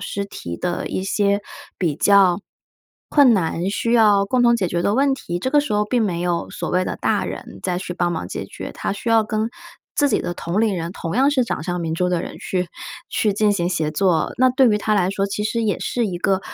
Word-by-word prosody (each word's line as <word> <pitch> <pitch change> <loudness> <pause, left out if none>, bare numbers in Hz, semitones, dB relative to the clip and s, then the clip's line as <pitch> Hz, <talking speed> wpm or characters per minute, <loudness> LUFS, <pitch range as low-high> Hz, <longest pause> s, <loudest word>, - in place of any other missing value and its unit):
师 200 - -3
提 85 - -7
的 175 -1 -3
一 - - -3
些 200 +1 +1 0.4
比 165 -5 0
较 195 0 +4 0.7
困 280 -5 +6
难、 180 -2 0
需 230 +3 -1
要 210 -4 +5
共 250 +4 +2
同 235 0 +5
解 185 -5 -1
决 170 0 -1
的 200 - +1
问 275 +2 +3
题， 175 -9 -5
这 260 +9 -2
个 295 +1 +5
时 290 -5 -4
候 210 0 +2
并 235 +2 +1
没 180 -5 -1
有 175 -1 -1
所 - - -5
谓 185 +1 +1
的 - - -3
大 - - 0
人 - - -7
再 180 -2 -1
去 180 -1 -5
帮 175 -1 0
忙 90 - -4
解 - - -5
决。 - - -8
他 - - -3
需 205 +4 -5
要 225 -1 +4
跟 215 +1 -1 0.5
自 290 - +3
己 225 - +1
的 175 - -4
同 175 +4 -2
龄 215 -4 +1
人， 170 0 -4
同 165 -1 -4
样 270 +3 +4
是 275 -3 +2
掌 230 - -3
上 175 +1 -3
明 160 -1 -2
珠 180 +2 0
的 180 -1 0
人 - - -8
去 180 -2 -2 0.4
去 230 -5 +1
进 210 +1 +2
行 175 -3 0
协 160 -4 -1
作。 165 -1 +1
那 255 +1 +5
对 255 0 +4
于 210 - +3
他 215 +1 0
来 185 -2 +2
说 195 0 -1
其 200 +1 -3
实 230 +2 -1
也 210 -3 0
是 240 -3 -1
一 180 -3 -4
个 190 +1 +1
200 Hz, 265 characters per minute, -21 LUFS, 175-225 Hz, 0.7 s, 困